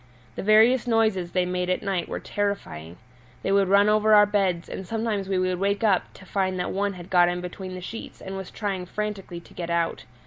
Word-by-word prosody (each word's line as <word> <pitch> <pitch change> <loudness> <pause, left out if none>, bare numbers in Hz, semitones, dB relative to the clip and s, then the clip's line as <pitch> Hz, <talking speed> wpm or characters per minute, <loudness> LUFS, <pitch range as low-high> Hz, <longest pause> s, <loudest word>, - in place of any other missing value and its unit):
The - - -4
various 220 +4 +5
noises 220 -6 +1
they 180 -1 +2
made 180 0 -2
at 185 - 0
night 190 -4 -2
were - - -3
terrifying; 195 - -4 0.5
they - - 0
would 195 -1 +3
run 200 +2 +5
over 215 0 +4
our 210 0 +8
beds 190 -4 0
and 190 - -7
sometimes 220 -3 -2
we 190 - +1
would 185 -1 0
wake 200 +3 0
up 200 -4 +2
to 190 - -14
find 185 -1 -1
that - - -2
one 200 +1 -1
had 180 0 -11
got 175 -1 +5
in 175 0 -2
between 185 +1 -7
the 185 - -7
sheets 225 +5 -8
and 190 0 -7
was 190 -1 -6
trying 195 -4 -4
frantically 200 -4 -4
to - - -18
get 170 -1 -5
out. 170 -1 -1
195 Hz, 220 wpm, -25 LUFS, 180-205 Hz, 0.5 s, our